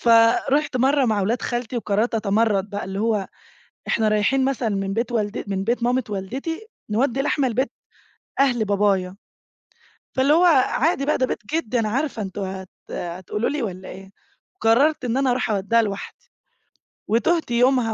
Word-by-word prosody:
فرُحت 235 +5 +4
مرّة 270 +2 +3
مع 215 -4 +1
ولاد 225 +5 -1
خالتي 240 0 -3
وقررت 220 +1 0
أتمرّد 210 -2 +1
بقى، 205 0 -4
اللي 195 +1 -5
هو 215 -3 0 0.6
إحنا 220 -1 +1
رايحين 215 +6 +2
مثلًا 265 -4 0
من 195 -1 -2
بيت 235 +3 -1
والدت 215 -2 -2
من 195 -1 -1
بيت 235 +3 -1
مامت 245 -1 0
والدتي 265 - -5 0.2
نوّدي 245 +4 +1
لحمة 280 -1 +1
لبيت 255 +4 -1 0.7
أهل 245 -5 +3
بابايا، 195 -2 +1 1.0
فاللي 265 +2 +4
هو 335 +3 +5 0.2
عادي 305 -1 +1
بقى 300 - +1
ده 255 - +2
بيت - - -3 0.2
جدي 250 -7 0
أنا 220 -2 0
عارفة 260 0 -2
أنتم 195 +1 -5
هت 190 -1 -5 0.2
هتقولوا 185 +5 -3
لي 290 -3 -2
والّا 185 -3 -5
إيه؟ 195 0 -10 0.5
قررت 260 +6 +3
إن 240 0 -1
أنا 270 -1 +2
أروح 245 -1 0
أودّيها 215 +3 +2
لوحدي، 200 -2 -6 0.8
وتُهت 315 +7 +1
يومها 245 -1 +3
230 Hz, 160 wpm, -22 LUFS, 205-260 Hz, 1.0 s, هو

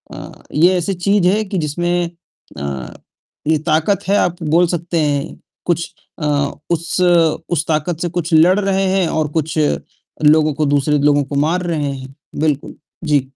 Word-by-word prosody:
अ, - - -9 0.2
ये 175 +5 +4
ऐसी 180 +3 -1
चीज़ 190 +1 +2
है 215 +3 +1
कि 190 -1 -4
जिसमें 175 +2 -1 0.5
अ, 70 -3 -5 0.5
ये 160 0 +3
ताकत 160 +6 +1
है 200 - +4
आप 175 -1 0
बोल 165 +3 +3
सकते 170 0 -2
हैं 145 0 -1 0.3
कुछ 170 -1 -1 0.3
अ, 150 - -3 0.4
उस 170 +1 -1 0.5
उस 160 -3 0
ताकत 155 +1 -1
से 175 - -1
कुछ 170 -1 -3
लड़ 175 +5 +5
रहे 195 -1 +1
हैं 190 -3 +2
और 155 -1 0
कुछ 160 0 -2 0.7
लोगों 155 0 +5
को 150 +1 0
दूसरे 145 +1 +2
लोगों 145 0 +3
को 140 +1 -6
मार 160 +6 +1
रहे 155 -5 -1
हैं। 130 0 -9 0.3
बिल्कुल, 150 -2 -1 0.3
जी। 150 -3 +3
160 Hz, 165 wpm, -18 LUFS, 150-175 Hz, 0.7 s, लड़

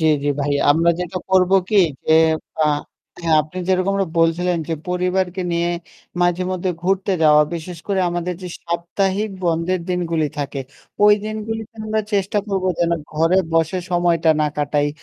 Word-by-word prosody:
জি, 160 - 0 0.2
জি 145 - +1
ভাই। 145 +1 0 0.2
আমরা 165 +3 +4
যেটা 180 +1 -4
করব 185 -1 +4 0.2
কি 210 - +1 0.3
যে 160 - +4 0.4
অ্যা 155 - +2 0.6
হ্যাঁ, 160 -2 +4
আপনি 155 +5 -9
যেরকমটা 190 +1 +1
বলছিলেন 170 +2 +2
যে 165 - 0
পরিবারকে 180 +1 0
নিয়ে 170 0 +1 0.5
মাঝে 175 +1 +2
মধ্যে 185 0 -1
ঘুরতে 195 +1 +1
যাওয়া 150 -1 +6
বিশেষ 170 +1 -6
করে 195 -2 0
আমাদের 175 +1 -2
যে 180 - -5 0.2
সাপ্তাহিক 190 +5 -1
বন্ধের 170 +2 0
দিনগুলি 170 -3 0
থাকে 140 -1 -3 0.4
ওই 210 - +8
দিনগুলিতে 220 +1 -5
আমরা 215 0 0
চেষ্টা 200 +1 +1
করব 195 -2 -2
যেন 170 0 +1 0.2
ঘরে 165 +4 +3 0.2
বসে 165 +2 +1
সময়টা 170 -2 +2
না 150 - +3
কাটাই। 145 0 +1
175 Hz, 155 wpm, -20 LUFS, 165-190 Hz, 0.6 s, ওই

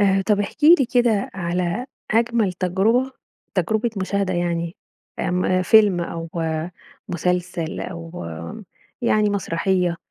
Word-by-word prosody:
آآ 195 -1 +3
طب 210 -2 +3
احكِ 250 +9 -3
لي 305 -6 +7
كده 235 -5 +2
على 180 +5 -2 0.2
أجمل 230 -3 +2
تجربة 200 +9 +1 0.4
تجربة 220 +6 +1
مشاهدة 190 0 -1
يعني، 170 -1 -1 0.4
آمم 180 +1 +1
فيلم 205 -2 +5
أو 165 -1 -5 0.8
مسلسل 175 -1 -2
أو 170 - -7 0.8
يعني 210 -1 +3
مسرحية، 180 -2 0
185 Hz, 105 wpm, -22 LUFS, 175-215 Hz, 0.8 s, لي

